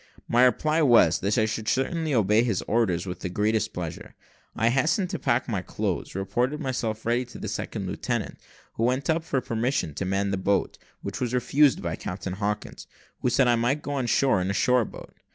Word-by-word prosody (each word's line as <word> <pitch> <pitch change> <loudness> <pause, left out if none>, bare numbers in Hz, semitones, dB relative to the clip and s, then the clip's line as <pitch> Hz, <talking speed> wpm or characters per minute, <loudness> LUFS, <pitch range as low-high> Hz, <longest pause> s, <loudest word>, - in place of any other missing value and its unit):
My 120 +2 +5
reply 155 +6 +2
was, 120 - +5
that 100 +4 0
I 110 - +3
should 110 0 -4
certainly 155 +6 0
obey 110 -3 +3
his 115 -7 -1
orders 100 -7 +1
with 90 -2 -5
the 95 - -4
greatest 110 +3 0
pleasure. 85 -3 -7 0.4
I 115 +1 +2
hastened 155 - +1
to - - -3
pack - - +1
up - - -11
my - - -1
clothes, - - -3
reported 120 +10 -1
myself 120 -6 -3
ready 120 +2 +1
to 120 - -12
the - - -5
second - - -4
lieutenant, - - -3 0.4
who 115 - 0
went 130 +6 +1
up 160 0 0
for 145 -4 0
permission 120 - -1
to 95 - -3
man 100 +1 0
a - - 0
boat, 100 +1 0 0.2
which - - -5
was 125 0 -1
refused 135 +2 +3
by 85 -2 -3
Captain 90 0 -5
Hawkins, 105 +2 -4 0.3
who - - +1
said 130 +1 +3
I 120 - +4
might 120 +6 0
go 145 - -4
on 135 -4 -1
shore 130 -4 +3
in 90 - -1
a - - 0
shore 125 +3 +3
boat. - - -11
115 Hz, 210 wpm, -26 LUFS, 100-130 Hz, 0.4 s, My